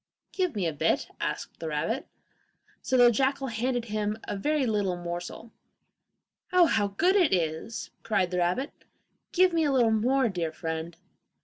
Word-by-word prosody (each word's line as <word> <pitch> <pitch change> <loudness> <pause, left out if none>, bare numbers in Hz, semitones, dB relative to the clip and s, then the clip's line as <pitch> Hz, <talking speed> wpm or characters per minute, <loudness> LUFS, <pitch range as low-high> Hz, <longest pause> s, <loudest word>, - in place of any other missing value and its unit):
'Give 365 - -1
me 195 -4 -1
a 165 - 0
bit,' 150 - 0
asked - - -4
the 165 - -5
rabbit. 160 - -2 0.7
So 260 - +1
the 245 -1 +7
jackal 270 +2 0
handed 240 +1 -1
him 210 -1 -2
a - - -2
very 290 +7 0
little 205 -5 0
morsel. 175 +6 -6 1.0
'Oh, 365 -1 +6
how 205 -10 +2
good 340 - +2
it 360 -7 +4
is!' 165 +4 -2
cried 200 -5 0
the 180 - 0
rabbit; 180 - 0 0.6
'give 365 0 +4
me 330 -1 +2
a 290 - +2
little 240 -4 +3
more, 250 +4 +2
dear 175 -6 -2
friend! 160 +1 -5
220 Hz, 165 wpm, -28 LUFS, 180-270 Hz, 1.0 s, the